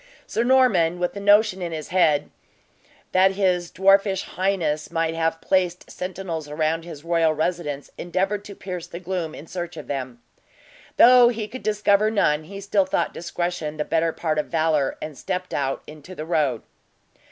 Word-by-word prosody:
Sir 230 - -1
Norman, 240 -10 +3
with 180 +2 -2
a - - -4
notion 205 -1 +4
in 175 -1 -3
his 155 -2 -6
head 160 -5 +2 0.8
that 190 +1 +4
his 180 -3 +1
dwarfish 195 +1 +3
highness 175 -6 -1
might 165 0 -1
have 165 0 -1
placed 180 -1 0
sentinels 180 -4 -5
around 155 +2 -1
his 160 -4 -10
royal 165 -2 +2
residence, 155 -3 -3
endeavored 195 +3 -1
to 200 - -9
pierce 180 -3 -6
the 170 0 -8
gloom 175 -3 -4
in 150 - -10
search 175 0 -6
of - - -7
them. 130 -4 -5 0.8
Though 245 0 +8
he 225 -3 -3
could 255 +4 -8
discover 210 0 +2
none, 155 -8 +1
he 195 +4 -8
still 200 -1 +1
thought - - 0
discretion 175 -3 -3
the 150 - -1
better 165 0 +1
part 155 -2 -1
of - - -2
valor, 155 -4 +1
and 155 -1 -6
stepped 185 +4 -4
out 135 -1 -2
into 155 +4 -11
the 155 - -6
road. 150 -8 0
175 Hz, 170 wpm, -23 LUFS, 155-195 Hz, 0.8 s, Though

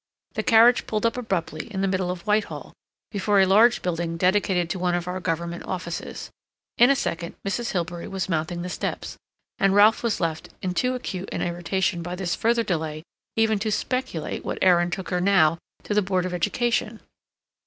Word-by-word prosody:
The - - -1
carriage 235 +1 +5
pulled 215 0 -1
up 230 - +2
abruptly 215 -3 -3
in 190 -2 -3
the 195 - +2
middle 185 -1 0
of 180 +1 -5
Whitehall 210 0 -1 0.4
before 205 0 +2
a 190 - +6
large 220 +6 +5
building 170 -1 -2
dedicated 180 -1 +2
to 185 - -3
one 180 -1 +1
of 175 0 -3
our 180 +1 -3
Government 170 -1 -3
offices. 175 -3 -5 0.5
In 245 +2 +7
a 275 - +5
second 170 -9 -3
Mrs. 230 +3 -2
Hilbery 175 -1 -3
was 190 -1 -3
mounting 170 0 -2
the 180 - -4
steps, - - -4 0.4
and 195 0 +3
Ralph 210 +2 +6
was 230 -3 0
left 165 -2 -2
in 185 -1 -1
too 250 +7 0
acute 195 -6 -5
an - - -2
irritation 175 +1 -1
by 175 +2 -4
this 180 -2 -2
further 230 +4 +2
delay 160 -5 -3 0.3
even 220 -2 +2
to 215 +1 -1
speculate 220 - -2
what - - -3
errand 175 -1 +4
took 185 +2 -4
her 180 -1 0
now 170 -4 +4 0.2
to - - -2
the 210 - +4
Board 185 -2 0
of 185 - -3
Education. 215 +4 0
185 Hz, 190 wpm, -24 LUFS, 175-215 Hz, 0.5 s, In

